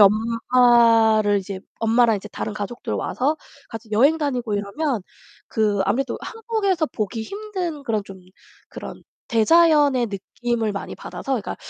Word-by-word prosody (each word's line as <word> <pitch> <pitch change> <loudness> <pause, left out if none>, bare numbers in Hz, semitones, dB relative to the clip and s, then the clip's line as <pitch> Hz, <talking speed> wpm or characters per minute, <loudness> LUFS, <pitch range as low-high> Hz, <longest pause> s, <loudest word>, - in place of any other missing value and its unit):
엄마를 225 0 +4
이제 195 0 -6 0.2
엄마랑 225 0 +4
이제 205 +1 -8
다른 210 - -5
가족들 215 +3 -5
와서 285 +5 -1 0.3
같이 225 -1 -9
여행 275 +9 +4
다니고 250 -7 -2
이러면 210 +4 -2 0.5
그 210 -2 +1
아무래도 265 +3 -1
한국에서 430 -7 -1
보기 220 -3 -4
힘든 370 - -5
그런 225 -6 -1
좀 195 -1 -11 0.5
그런 - - -9 0.2
대자연의 290 +1 +4
느낌을 225 +3 -3
많이 200 - -6
받아서 270 - -6
그러니까 235 -6 -2
235 Hz, 315 characters per minute, -22 LUFS, 215-290 Hz, 0.5 s, 엄마를